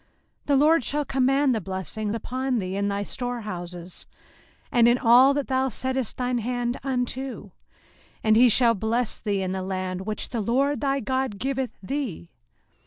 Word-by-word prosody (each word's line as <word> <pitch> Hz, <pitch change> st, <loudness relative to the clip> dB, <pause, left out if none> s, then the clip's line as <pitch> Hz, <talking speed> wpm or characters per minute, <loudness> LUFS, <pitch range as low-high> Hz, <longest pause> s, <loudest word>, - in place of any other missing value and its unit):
05:028:008 -, -, -38 dB, 0.4 s
The 285 Hz, -, +3 dB
LORD 300 Hz, +2 st, +4 dB
shall 295 Hz, +3 st, 0 dB
command 270 Hz, +1 st, +2 dB
the 220 Hz, -, -1 dB
blessing 195 Hz, +3 st, -4 dB
upon 255 Hz, +3 st, -2 dB
thee 185 Hz, -3 st, -3 dB
in 200 Hz, 0 st, 0 dB
thy 200 Hz, 0 st, -1 dB
storehouses, 185 Hz, -8 st, -5 dB, 0.6 s
and 235 Hz, -1 st, +5 dB
in 240 Hz, +1 st, +4 dB
all 255 Hz, +3 st, +6 dB
that 285 Hz, -2 st, -1 dB
thou 265 Hz, 0 st, 0 dB
settest 260 Hz, 0 st, -2 dB
thine 250 Hz, -1 st, 0 dB
hand 245 Hz, +1 st, -2 dB
unto; 260 Hz, 0 st, -3 dB, 0.7 s
and 220 Hz, 0 st, +4 dB
he 245 Hz, +2 st, +7 dB
shall 235 Hz, +1 st, +6 dB
bless 225 Hz, +3 st, -1 dB
thee 200 Hz, -3 st, -1 dB
in 185 Hz, -, -2 dB
the 190 Hz, 0 st, -3 dB
land 185 Hz, 0 st, -4 dB
which 215 Hz, -, -3 dB
the 235 Hz, -, -2 dB
LORD 275 Hz, +7 st, +1 dB
thy 275 Hz, -1 st, 0 dB
God 260 Hz, -5 st, -1 dB
giveth 265 Hz, +2 st, -2 dB
thee. 225 Hz, -, -4 dB
245 Hz, 170 wpm, -25 LUFS, 205-265 Hz, 0.7 s, he